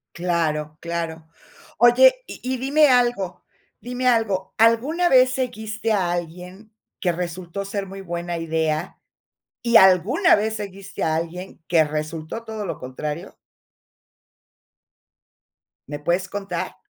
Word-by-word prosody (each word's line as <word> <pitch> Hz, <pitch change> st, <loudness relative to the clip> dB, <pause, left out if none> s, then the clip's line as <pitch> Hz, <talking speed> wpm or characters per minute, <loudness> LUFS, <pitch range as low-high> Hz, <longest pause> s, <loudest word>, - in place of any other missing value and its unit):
Claro, 160 Hz, -4 st, -1 dB
claro. 165 Hz, -1 st, -4 dB, 0.5 s
Oye, -, -, +6 dB
y -, -, -9 dB
y 255 Hz, -, -4 dB
dime 290 Hz, +4 st, +4 dB
algo 240 Hz, -8 st, +1 dB, 0.4 s
dime 250 Hz, +3 st, -4 dB
algo, 220 Hz, -6 st, +1 dB
¿alguna 260 Hz, +11 st, +3 dB
vez 255 Hz, -1 st, +5 dB
seguiste 225 Hz, -4 st, -3 dB
a 185 Hz, -4 st, +1 dB
alguien 180 Hz, +5 st, -7 dB, 0.3 s
que 180 Hz, -, +1 dB
resultó 175 Hz, +2 st, -4 dB
ser 195 Hz, 0 st, -4 dB
muy 195 Hz, +1 st, -9 dB
buena 175 Hz, -1 st, -4 dB
idea? 160 Hz, 0 st, -2 dB, 0.6 s
¿Y 235 Hz, -1 st, +6 dB
alguna 190 Hz, -, +5 dB
vez 220 Hz, +1 st, -1 dB
seguiste 195 Hz, -1 st, -7 dB
a 160 Hz, -1 st, +1 dB
alguien 170 Hz, +2 st, -6 dB
que 165 Hz, -2 st, +4 dB
resultó 155 Hz, +7 st, -5 dB
todo 220 Hz, -2 st, -6 dB
lo -, -, -4 dB
contrario? 150 Hz, +5 st, -6 dB, 2.5 s
¿Me 145 Hz, +1 st, -5 dB
puedes 175 Hz, +5 st, 0 dB
contar? 200 Hz, -1 st, -5 dB
190 Hz, 120 wpm, -22 LUFS, 170-225 Hz, 2.5 s, Oye